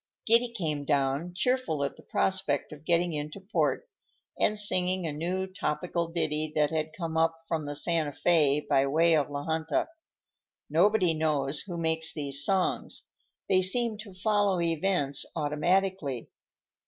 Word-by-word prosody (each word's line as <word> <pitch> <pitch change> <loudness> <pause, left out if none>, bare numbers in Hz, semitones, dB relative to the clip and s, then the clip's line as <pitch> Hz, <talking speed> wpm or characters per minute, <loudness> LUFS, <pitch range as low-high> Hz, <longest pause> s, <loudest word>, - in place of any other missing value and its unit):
Giddy 235 +2 +4
came 155 -9 -2
down, 140 +4 0
cheerful 250 - 0
at 140 - -3
the - - -15
prospect 185 -7 0
of 150 0 -12
getting 170 0 +2
into 150 +4 -5
port, 215 - -1 0.5
and 210 - +2
singing 185 -3 +3
a 160 - -2
new 180 +5 -2
topical 170 -1 -3
ditty 155 -2 -1
that 150 0 +2
had 155 -1 -2
come 165 -3 -3
up 165 0 +3
from 160 -3 -2
the 145 - -4
Santa 160 0 +1
Fé 150 -2 +2
by 135 +1 +3
way 165 +4 +3
of 145 -2 +1
La 145 0 -4
Junta. 160 - -1 0.8
Nobody 180 +1 +3
knows 150 -2 0
who 175 -3 -5
makes 160 -1 0
these 140 -2 -1
songs; 190 +3 0 0.4
they 185 -1 +3
seem 225 +4 +3
to 210 -2 -9
follow 200 -1 +1
events 165 -4 0
automatically. 155 -2 -1
165 Hz, 150 wpm, -28 LUFS, 150-185 Hz, 0.8 s, Giddy